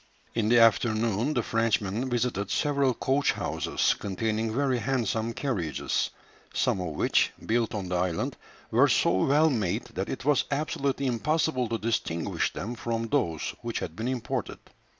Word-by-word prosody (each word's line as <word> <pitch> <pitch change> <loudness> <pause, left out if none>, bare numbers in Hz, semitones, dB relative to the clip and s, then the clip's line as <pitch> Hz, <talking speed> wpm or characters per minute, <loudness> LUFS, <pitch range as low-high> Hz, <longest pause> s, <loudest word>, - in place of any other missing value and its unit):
In 110 -2 +1
the 120 - +5
afternoon 115 +3 +3
the 120 - +1
Frenchmen 115 +1 0
visited 120 -4 -1
several 140 -3 +1
coach 140 +2 +1
houses, - - 0
containing 110 +3 -1
very 130 +1 +1
handsome 115 -2 0
carriages, 105 - -1 0.5
some 95 - +1
of 80 -4 -4
which, - - +2
built 115 -1 0
on 100 -3 -3
the 90 - 0
island, 90 -2 -1 0.4
were - - +5
so 95 +1 +3
well 150 +3 +4
made 105 -9 0
that - - -3
it - - -5
was 145 -3 +3
absolutely 140 -1 -1
impossible 130 +1 +1
to 115 - 0
distinguish 105 -7 -1
them 115 +5 -5
from 115 -1 -3
those 80 -5 0
which 115 -1 -3
had 80 - -4
been 110 +3 -3
imported. 125 -3 -3
115 Hz, 150 wpm, -28 LUFS, 105-130 Hz, 0.5 s, the